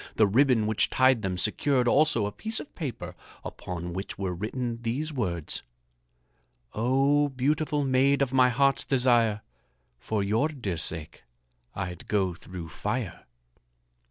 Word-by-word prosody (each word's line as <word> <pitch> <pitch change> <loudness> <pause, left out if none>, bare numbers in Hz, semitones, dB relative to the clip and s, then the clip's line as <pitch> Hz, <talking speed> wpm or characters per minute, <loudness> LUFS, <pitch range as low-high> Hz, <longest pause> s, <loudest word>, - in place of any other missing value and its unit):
The 110 - +5
ribbon 120 +1 +3
which 110 0 +1
tied 130 -3 +4
them 95 -3 -2
secured 125 +8 +1
also 140 -5 +3
a 105 - -3
piece 220 - -3
of - - -10
paper 120 - -5 0.3
upon 85 -1 -6
which 95 +2 -5
were 95 -2 -2
written 115 +5 -4
these 135 +7 -2
words: 90 - -2 1.1
"Oh, 135 +5 +2
beautiful 145 +2 0
maid 135 +2 +3
of 135 -1 -3
my 130 -1 +5
heart's 135 0 +2
desire, 120 -5 +2 0.6
For 105 - -1
your 110 +8 +2
dear 120 - -4
sake 80 0 -5 0.5
I'd 90 -2 -5
go 95 -4 +1
through 85 -1 -9
fire." 80 - -4
120 Hz, 135 wpm, -27 LUFS, 95-135 Hz, 1.1 s, The